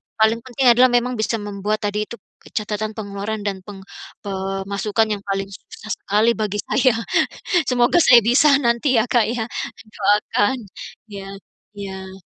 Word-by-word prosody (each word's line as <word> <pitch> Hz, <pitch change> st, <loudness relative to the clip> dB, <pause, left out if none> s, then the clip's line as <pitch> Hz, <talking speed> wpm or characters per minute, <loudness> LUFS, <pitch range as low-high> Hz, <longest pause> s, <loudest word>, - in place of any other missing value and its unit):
paling 220 Hz, +1 st, +3 dB
penting 255 Hz, +2 st, -3 dB
adalah 250 Hz, +2 st, +6 dB
memang 245 Hz, 0 st, +1 dB
bisa 220 Hz, +1 st, 0 dB
membuat 205 Hz, 0 st, -3 dB
tadi 210 Hz, +1 st, -1 dB
itu, -, -, -8 dB, 0.3 s
ke -, -, -16 dB
catatan 215 Hz, 0 st, -2 dB
pengeluaran 205 Hz, 0 st, -4 dB
dan 195 Hz, -2 st, -3 dB
peng 200 Hz, 0 st, -10 dB, 0.4 s
pemasukan 195 Hz, +2 st, -1 dB
yang 200 Hz, -, -11 dB
paling 195 Hz, 0 st, -2 dB
susah 215 Hz, +2 st, -10 dB
sekali 215 Hz, +3 st, +2 dB
bagi 210 Hz, -1 st, -2 dB
saya. 260 Hz, -1 st, +3 dB, 0.8 s
Semoga 245 Hz, +5 st, +3 dB
saya 245 Hz, -7 st, +7 dB
bisa 250 Hz, +6 st, +5 dB, 0.2 s
nanti 235 Hz, +2 st, +2 dB
ya, 220 Hz, -, +4 dB
Kak, 235 Hz, -3 st, +4 dB
ya. 230 Hz, -1 st, -2 dB, 0.5 s
Doakan. 205 Hz, +4 st, +1 dB, 0.5 s
Iya. 195 Hz, -1 st, -7 dB, 0.5 s
Iya. 190 Hz, -1 st, -8 dB
215 Hz, 145 wpm, -21 LUFS, 200-235 Hz, 0.8 s, saya